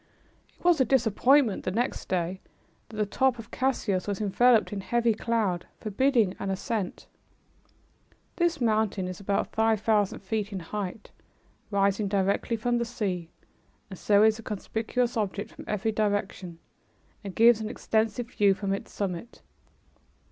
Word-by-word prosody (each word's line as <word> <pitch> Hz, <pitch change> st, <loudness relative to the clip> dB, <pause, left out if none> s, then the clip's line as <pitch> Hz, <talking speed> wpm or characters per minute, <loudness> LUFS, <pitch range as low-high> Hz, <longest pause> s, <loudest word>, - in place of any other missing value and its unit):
It -, -, -23 dB
was 345 Hz, -5 st, +5 dB
a -, -, +7 dB
disappointment 245 Hz, 0 st, +3 dB
the -, -, -1 dB
next 235 Hz, +7 st, -2 dB
day 180 Hz, +1 st, -1 dB, 0.5 s
that 220 Hz, -, -11 dB
the 210 Hz, -, +1 dB
top 260 Hz, +4 st, +1 dB
of 225 Hz, -2 st, -10 dB
Cassius 210 Hz, -8 st, -1 dB
was 200 Hz, -2 st, -2 dB
enveloped 220 Hz, +2 st, +3 dB
in 200 Hz, -, -3 dB
heavy 235 Hz, +2 st, +1 dB
cloud, 215 Hz, -5 st, -1 dB
forbidding 225 Hz, -2 st, +1 dB
an 195 Hz, -, -3 dB
ascent. 195 Hz, 0 st, -3 dB, 1.3 s
This 340 Hz, -3 st, +1 dB
mountain 215 Hz, -5 st, +1 dB
is 185 Hz, -1 st, -6 dB
about 200 Hz, 0 st, -1 dB
five 220 Hz, -1 st, +2 dB
thousand 210 Hz, -2 st, +1 dB
feet 205 Hz, +1 st, -3 dB
in 195 Hz, -, -4 dB
height, 200 Hz, +3 st, -6 dB, 0.6 s
rising 200 Hz, 0 st, +1 dB
directly 200 Hz, +3 st, 0 dB
from 240 Hz, +2 st, 0 dB
the -, -, +1 dB
sea, 190 Hz, -8 st, -3 dB, 0.6 s
and 190 Hz, -, -8 dB
so 205 Hz, 0 st, +4 dB
is 220 Hz, 0 st, +4 dB
a -, -, -6 dB
conspicuous 225 Hz, +3 st, -2 dB
object 205 Hz, -1 st, -2 dB
from -, -, -11 dB
every 210 Hz, +1 st, -1 dB
direction 205 Hz, -4 st, -2 dB, 0.7 s
and 195 Hz, -2 st, -7 dB
gives 230 Hz, -1 st, +6 dB
an 215 Hz, -, -3 dB
extensive 225 Hz, +2 st, -1 dB
view 200 Hz, -2 st, +3 dB
from 195 Hz, 0 st, -2 dB
its 195 Hz, -, -5 dB
summit. 195 Hz, +3 st, -5 dB
215 Hz, 150 wpm, -27 LUFS, 195-230 Hz, 1.3 s, a